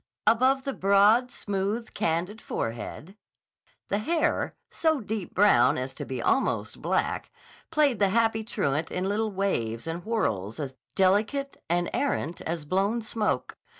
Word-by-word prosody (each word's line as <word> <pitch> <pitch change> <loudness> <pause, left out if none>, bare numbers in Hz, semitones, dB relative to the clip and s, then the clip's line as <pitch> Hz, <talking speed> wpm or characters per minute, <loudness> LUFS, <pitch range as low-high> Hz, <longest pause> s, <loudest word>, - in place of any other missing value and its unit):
Above 260 +3 +4
the 275 - -2
broad, 205 +5 +4
smooth, 205 +2 -3
candid 180 +7 -1
forehead, 120 - -5 0.7
the 200 - +1
hair, 320 +8 0 0.2
so 315 -3 +1
deep 215 -4 -5
brown 180 -12 +5
as 130 +1 -3
to - - -6
be 130 -2 -4
almost 265 - 0
black, - - -1 0.4
played 295 -7 +2
the 200 -2 +4
happy 225 +1 +2
truant 160 -8 -1
in 185 +1 -2
little 215 +2 0
waves 120 - -1
and 165 +1 -4
whorls 115 - -1
as 135 -3 -4 0.2
delicate 215 +9 +1
and 175 0 +1
errant 175 - -1
as 165 -2 -3
blown 195 +8 +1
smoke. 215 0 -1
200 Hz, 140 wpm, -27 LUFS, 165-230 Hz, 0.7 s, brown